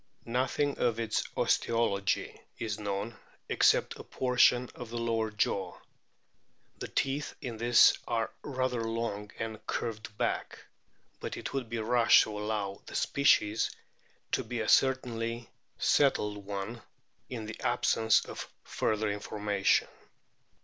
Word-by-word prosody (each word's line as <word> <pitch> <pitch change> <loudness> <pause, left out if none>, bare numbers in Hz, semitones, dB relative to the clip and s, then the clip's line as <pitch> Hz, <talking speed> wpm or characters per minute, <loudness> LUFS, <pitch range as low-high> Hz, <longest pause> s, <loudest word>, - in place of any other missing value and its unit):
Nothing 130 +4 0
of 115 -2 +1
its 115 -2 0
osteology 105 -4 +1 0.2
is 110 -2 -3
known 100 +2 -3 0.3
except - - +3
a - - -7
portion 125 -1 +3
of 120 -2 -8
the 120 - -5
lower 115 -1 0
jaw. 100 -3 -1 1.0
The - - -4
teeth 140 +2 -1
in 120 -5 -6
this 120 +1 +6
are 115 -2 -1
rather 130 -3 -1
long 115 -2 -3
and 110 -1 -5
curved 110 -1 -4
back, - - -1 0.6
but - - -5
it - - -6
would 130 -4 -3
be 115 - -3
rash 115 +1 +5
to 110 - -6
allow 105 -2 -3
the - - -8
species 110 -6 +3 0.6
to - - +1
be 120 - -4
a 110 - -2
certainly 120 -3 +1 0.3
settled 105 -8 +2
one 100 +4 -4 0.5
in 115 -4 -5
the 110 0 -7
absence 110 -1 +2
of - - -7
further 110 0 -1
information. 105 -1 +1
115 Hz, 130 wpm, -30 LUFS, 105-120 Hz, 1.0 s, this